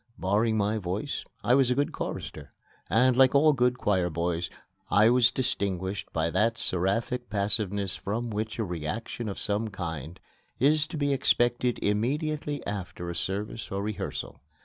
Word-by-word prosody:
Barring 110 +4 +1
my 105 +1 +1
voice, 100 +9 -3 0.2
I 120 - +3
was 135 -1 +4
a 125 - +2
good 145 +2 +1
chorister, - - -6 0.4
and, 125 +4 +4
like 130 +1 +5
all 150 +2 +6
good 125 -1 +2
choir 95 -7 +1
boys, 85 +1 -1 0.4
I 110 +3 +5
was 125 -1 +5
distinguished 100 -5 -2
by 80 0 0
that 115 +4 +2
seraphic 115 +7 0
passiveness 100 -1 0
from 115 +3 -3
which 110 +1 -3
a 115 - 0
reaction 95 +6 -4
of 100 - -5
some 105 +2 -1
kind 85 -5 -6 0.4
is 150 +3 +3
to 165 - -6
be 145 -1 +1
expected 120 -2 +2
immediately 145 +7 -1
after 90 -3 -4
a - - -6
service 100 +5 -3
or 100 +1 -2
rehearsal. 105 0 -5
105 Hz, 155 wpm, -28 LUFS, 95-125 Hz, 0.4 s, all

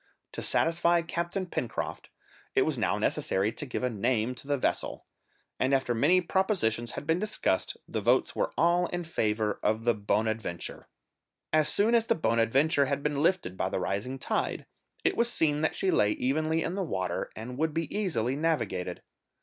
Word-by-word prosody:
To - - -5
satisfy 170 +1 +2
Captain 170 +3 -2
Pencroft, 130 -8 -4 0.5
it - - +5
was - - 0
now - - 0
necessary 100 +3 0
to 150 - -5
give 125 - -3
a 125 - +2
name 115 +2 0
to 125 +2 -13
the 145 -1 +1
vessel, - - -2 0.5
and, 130 +1 +3
after 130 -2 0
many 155 +11 +4
propositions 170 - 0
had - - -6
been 160 +3 +2
discussed, 210 - -1
the - - -3
votes - - +2
were - - 0
all 175 +2 +3
in 175 0 -3
favour 110 -9 0
of 110 +1 +1
the 120 0 +3
Bonadventure. 110 -3 -2 0.7
As 155 -1 +4
soon 215 +7 +2
as 230 -1 +3
the - - +3
Bonadventure 135 +3 +3
had 140 +1 -2
been 145 -1 0
lifted 175 - +1
by - - -1
the - - -2
rising 110 +7 -2
tide, - - -2 0.4
it - - +2
was 235 0 +2
seen 150 -6 +1
that 160 - +1
she 190 -2 +1
lay 105 0 +3
evenly 155 +5 0
in 170 - -2
the 195 - -2
water, 95 - -2
and 125 +4 -7
would 160 0 +1
be 165 +2 -2
easily 135 - 0
navigated. 115 - -1
140 Hz, 180 wpm, -29 LUFS, 115-170 Hz, 0.7 s, it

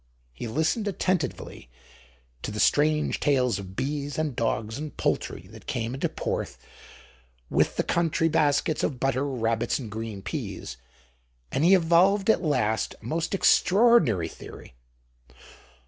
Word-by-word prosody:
He 115 - -6
listened 160 - 0
attentively 180 - -2 0.7
to - - -4
the 105 0 -5
strange 150 +4 +2
tales 125 -7 +1
of 95 -1 -9
bees 140 +2 -3
and 155 -5 -1
dogs 115 +1 -2
and 150 0 -7
poultry - - -2
that - - -14
came 115 0 -2
into 135 - -1
Porth - - -4 0.9
with - - +2
the - - 0
country 165 -1 +1
baskets 155 0 +1
of 130 -5 -2
butter, 135 +1 0
rabbits, 115 -4 -1
and 115 -6 -7
green 110 -2 -6
peas; 65 - -5 0.7
and 140 - 0
he 185 +3 +7
evolved 190 +4 +4
at 200 - 0
last 125 - 0
a - - -16
most 165 - -1
extraordinary 180 - +4
theory. 80 - -12
145 Hz, 135 wpm, -26 LUFS, 115-165 Hz, 0.9 s, he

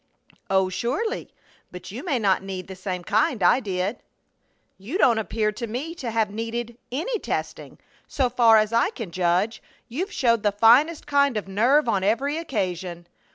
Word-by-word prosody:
"Oh, 190 -1 +3
surely, 400 - -2 0.4
but - - -9
you - - -7
may 295 -8 0
not 200 -5 +2
need 190 -1 -6
the 190 - -8
same 185 -1 -5
kind 215 +2 +1
I 175 - +5
did." 195 -1 -3 0.8
"You 235 - -4
don't 235 - +4
appear 215 0 -1
to 235 +3 -6
me 265 +9 -4
to 270 -8 -5
have 220 -2 0
needed 230 +2 -4 0.2
any 365 - -2
testing. - - -5 0.3
So 265 -3 0
far 230 -2 +5
as 215 +1 +1
I 235 +9 +3
can 225 - -7
judge, 180 +5 0 0.3
you've 345 - -4
showed 230 -3 +2
the 205 - +2
finest 250 +10 +4
kind 280 -4 +2
of 205 - -4
nerve 240 +9 +3
on 195 -4 +1
every 275 +9 0
occasion." 180 - -3
225 Hz, 170 wpm, -24 LUFS, 195-265 Hz, 0.8 s, I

